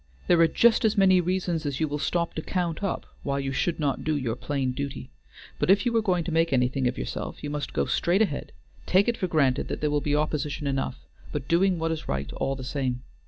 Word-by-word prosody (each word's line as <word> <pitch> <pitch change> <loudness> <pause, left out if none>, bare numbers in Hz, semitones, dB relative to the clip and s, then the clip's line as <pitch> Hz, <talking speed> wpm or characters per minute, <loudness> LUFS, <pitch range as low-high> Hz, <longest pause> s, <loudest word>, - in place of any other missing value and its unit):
There 175 - +4
are 165 - +7
just 235 +9 +4
as 220 -1 +2
many 190 -2 +5
reasons 175 -2 -1
as 140 -3 -3
you 160 - +1
will 150 0 -3
stop 170 +2 -1
to 160 - -3
count 170 -2 -2
up 195 - -2 0.2
why 140 -1 -1
you 135 -1 -2
should 170 +5 -1
not 145 -3 -1
do 155 0 0
your 120 -5 -2
plain 135 -3 -2
duty, 140 - -5 0.5
but - - 0
if 200 +3 +5
you 235 -1 +1
are 225 - +4
going 180 -5 +1
to 170 - -4
make 165 +1 +2
anything 130 0 +2
of 125 - -2
yourself - - -5
you 145 - -3
must 150 -1 -3
go - - 0
straight 185 +5 +2
ahead, 150 -9 -3 0.4
taking 200 +6 +4
it - - -11
for 185 - 0
granted 140 -6 +2
that - - -4
there 150 -1 0
will 145 0 +1
be 145 0 0
opposition 150 0 -1
enough, 70 - -2 0.3
but 140 -2 -4
doing 180 +2 +3
what 165 0 -1
is 160 -1 -4
right 70 +1 -2
all 135 - -1
the 130 - -7
same. 125 -2 -2
150 Hz, 245 wpm, -26 LUFS, 135-175 Hz, 0.5 s, are